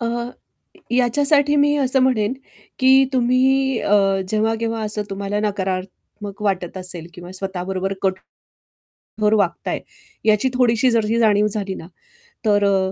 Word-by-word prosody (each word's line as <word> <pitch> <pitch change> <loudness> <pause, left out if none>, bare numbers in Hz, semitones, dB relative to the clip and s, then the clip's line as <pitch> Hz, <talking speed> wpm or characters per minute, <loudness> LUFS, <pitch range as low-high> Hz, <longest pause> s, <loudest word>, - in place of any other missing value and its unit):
अ, - - -3
अ, 235 +1 -2 0.7
य 240 - +2
याच्यासाठी 285 +4 +3
मी 290 0 +3
असं 265 -1 +2
म्हणेन 240 -3 +1 0.5
की 260 0 +5 0.2
तुम्ही 260 +1 +2
अ, 205 - 0 0.4
जेव्हा-केव्हा 225 +1 -1
असं 210 0 -2
तुम्हाला 200 +1 -3
नकारात्मक 195 0 -5
वाटत 190 -3 -2
असेल 180 -3 -6
किंवा 175 0 -10
स्वतः 190 -1 -5
बरोबर 190 +1 -3
कट 190 -1 +2 1.0
कठोर 210 0 +2
वागताय 195 -4 -1 0.5
याची 215 +4 +3
थोडीशी 250 0 +2
जरी 230 -2 +2
ही 230 - +1
जाणीव 210 -2 +3
झाली 200 -2 -3
ना 165 - -10 0.6
तर 205 -1 +3
अ, 190 -1 +1
210 Hz, 145 wpm, -20 LUFS, 195-245 Hz, 1.0 s, की